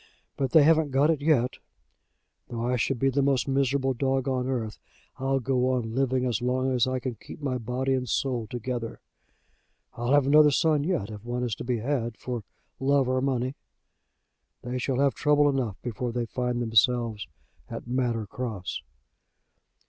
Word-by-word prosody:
But 135 -2 -1
they 160 -3 +6
haven't 160 0 +4
got 140 +4 +3
it 155 -3 -1
yet. 135 -5 +2 0.9
Though 120 -1 -4
I 125 +1 +1
should 125 +2 0
be 135 +3 +2
the 140 +2 +1
most 135 -2 +2
miserable 135 0 +1
dog 135 +1 0
on 130 -1 0
earth 115 -5 -3 0.4
I'll 135 +1 0
go 130 0 +1
on 115 -3 -2
living 130 0 +1
as 120 -4 -1
long 130 +1 0
as 125 -1 +2
I 130 0 0
can 125 0 -3
keep 115 - -12
my 135 -4 -2
body 125 +3 -1
and 125 -2 -1
soul 125 -3 -1
together. 120 -1 -4 0.9
I'll 120 +3 -1
have 145 -2 +5
another 150 +2 +7
son 150 0 +2
yet, 145 - -1
if 105 -1 -9
one 120 +1 -3
is 120 -3 -1
to - - -5
be 125 -1 0
had 120 -1 -2
for 125 -2 -4 0.4
love 135 -1 +2
or 130 0 +1
money. 130 -1 0 1.1
They 125 +1 -3
shall 130 0 -1
have 140 0 +3
trouble 145 0 +3
enough 130 -8 0
before 120 0 -3
they 120 0 -2
find 125 0 -2
themselves 115 -1 +2 0.4
at - - -6
Manor 120 -3 0
Cross." 105 -4 -5
130 Hz, 175 wpm, -27 LUFS, 120-135 Hz, 1.1 s, another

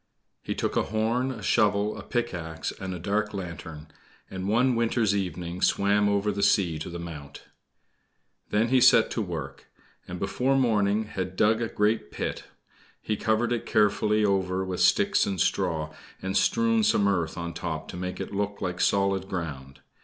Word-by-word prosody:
He - - -4
took - - -2
a - - +2
horn, 115 +4 0
a 115 -5 -8
shovel, 105 0 +2
a - - -7
pickaxe, 85 -10 -3
and 95 -1 -5
a 90 - -4
dark 105 +4 -1
lantern, 85 -4 -7 0.5
and 95 0 -4
one 120 +4 +3
winter's 115 -3 +1
evening 90 -2 -3
swam 105 +1 +3
over 100 +1 +1
the 100 0 -3
sea 85 -6 +2
to 80 - -5
the 85 - -6
Mount. 75 -5 -9 1.1
Then 110 +3 +1
he 130 0 +4
set 115 - +6
to 115 - -1
work, 80 -8 -6 0.4
and 90 - -6
before 125 +9 0
morning 110 -4 +2
had 95 -3 -5
dug 110 +3 +3
a 115 - 0
great 105 -8 0
pit. - - -4 0.5
He 110 - -2
covered 110 +3 +1
it 120 - -3
carefully 105 0 +2
over 95 -1 0
with 90 -1 -4
sticks - - +3
and 95 -2 -2
straw, 80 -1 0 0.3
and 95 0 -4
strewed 230 - +3
some 100 - +3
earth 85 -5 0
on 85 0 -4
the - - -8
top 80 -2 -4
to - - -7
make 90 +1 -5
it - - -5
look 100 0 -2
like 90 0 -3
solid 100 -1 +1
ground. 70 -7 -6
100 Hz, 175 wpm, -26 LUFS, 90-110 Hz, 1.1 s, set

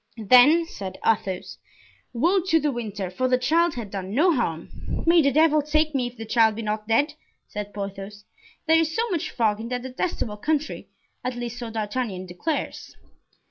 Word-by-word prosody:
"Then," 255 - +6
said 195 - -7
Athos, 195 -4 -1 0.5
"woe 340 +11 +2
to 325 -3 +4
De 295 -1 0
Winter, 210 -6 -4
for 255 +8 0
the 255 0 +3
child 320 +6 +2
had 225 -5 -6
done 195 +1 -5
no 340 +6 +4
harm." 170 - -3
"May 335 0 +6
the 280 -2 +3
devil 310 0 +4
take 305 +1 +1
me, 255 -3 0
if 245 0 -11
the 225 - -6
child 220 -1 +3
be 230 - -5
not 215 0 -3
dead," 285 +7 +2 0.3
said 205 0 -6
Porthos. 200 0 -7 0.4
"There 320 0 +5
is 325 0 0
so 460 +1 +1
much 345 -1 -1
fog 215 -3 0
in 230 +1 -6
that 250 0 -3
detestable 255 -4 -3
country, 305 +6 -2 0.3
at 250 0 -2
least 240 0 -5
so 240 -2 -5
D'Artagnan 215 -3 -3
declares." 185 - -4
245 Hz, 180 wpm, -24 LUFS, 210-305 Hz, 0.5 s, Then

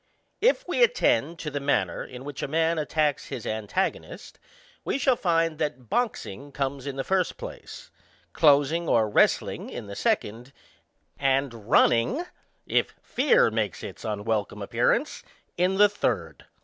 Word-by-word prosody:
If - - +2
we - - 0
attend 485 - +3
to 155 -2 -5
the 145 - -2
manner 140 +1 0
in 125 +1 -10
which 145 -2 -6
a. - - -2
man 160 +2 +1
attacks 150 -1 0
his 120 - -6
antagonist, 110 - -3 0.4
we - - -1
shall 270 -2 +3
find 165 -5 0
that 145 -7 -4
boxing 145 - -2
comes 135 0 -3
in 140 - -4
the 135 - -2
first 185 +1 0
place; - - -9 0.4
closing 155 +3 +3
or 110 -2 +3
wrest 105 - +3
ling - - -7
in 120 - -7
the 100 0 -8
second; 120 +7 -1 0.7
and 135 -1 +1
runningy 115 - +2 0.4
if - - 0
fear 260 - +3
makes 110 -1 -2
its - - -8
unwelcome 105 0 -2
appearance, - - 0 0.3
in 180 +2 +1
the 205 +1 +7
third. 205 - -3
145 Hz, 150 wpm, -26 LUFS, 120-170 Hz, 0.7 s, the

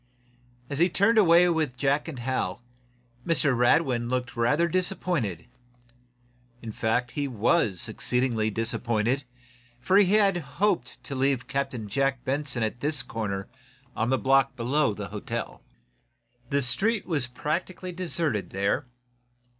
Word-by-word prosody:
As 140 +1 -4
he 175 +2 +4
turned 200 +6 +3
away 175 -2 +6
with 155 -7 0
Jack 140 +4 +1
and 155 -5 -6
Hal, 120 -5 -2 0.6
Mr. 150 -4 +2
Radwin 120 -1 +2
looked 125 0 -2
rather 150 +9 +2
disappointed. 170 - -1 1.1
In 115 -2 -7
fact, 115 +3 -1
he 145 -2 -2
was 110 - +1
exceedingly 120 -3 0
disappointed, 115 +3 -1 0.6
for 185 +10 +3
he 200 -1 +5
had 200 -3 +4
hoped 165 -2 -1
to - - -7
leave 135 -2 0
Captain 125 -4 -3
Jack 135 +3 -1
Benson 135 -3 -1
at 110 +2 -2
this 145 -2 -1
corner 100 -5 -4 0.5
on 115 +2 0
the 130 - +2
block 135 0 +2
below 125 -1 +1
the - - -6
hotel. - - -5 0.9
The 140 0 +2
street 195 - +1
was 145 -7 -1
practically 175 +8 -3
deserted 165 - -1
there. 100 +8 -1
135 Hz, 130 wpm, -26 LUFS, 120-165 Hz, 1.1 s, away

